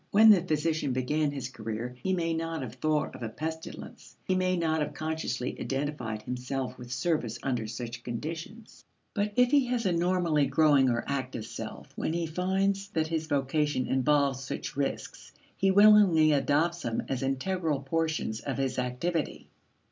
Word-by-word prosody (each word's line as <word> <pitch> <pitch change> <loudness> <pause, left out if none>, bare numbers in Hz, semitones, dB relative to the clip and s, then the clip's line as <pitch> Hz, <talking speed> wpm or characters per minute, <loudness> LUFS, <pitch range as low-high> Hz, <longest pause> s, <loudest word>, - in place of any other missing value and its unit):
When 220 +2 +8
the 195 -4 +6
physician 155 -4 0
began 145 +4 +1
his 135 -3 -4
career 115 +1 -5
he 190 - -1
may 165 -3 0
not 165 -2 -3
have 120 -3 -6
thought 150 +3 0
of 130 - -10
a 115 - -3
pestilence; 160 +7 -7
he 185 - +1
may 185 0 +1
not 160 -2 +1
have 150 -1 -3
consciously 155 -6 -3
identified 135 -6 -3
himself 125 +1 -3
with 120 0 -10
service 125 -3 -1
under 125 -5 -1
such 120 +1 -6
conditions. 165 - -7 0.3
But, 205 0 0
if 250 0 +4
he 285 -3 +5
has 245 -2 -1
a 185 - +3
normally 170 -4 +2
growing 140 -1 +4
or 120 -1 0
active 130 -5 -3
self, - - -7
when 160 - -2
he 170 0 -1
finds 190 +4 0
that 155 -1 0
his 160 -1 -2
vocation 145 -1 0
involves 135 0 +2
such 135 - -5
risks, 140 0 -4 0.2
he 195 - +2
willingly 195 -6 +6
adopts 150 +5 +2
them 115 -1 -2
as 130 -2 -2
integral 145 +3 -1
portions 160 -6 -1
of 135 -2 -4
his 135 -2 -1
activity. 140 +6 -2
150 Hz, 165 wpm, -29 LUFS, 130-170 Hz, 0.3 s, When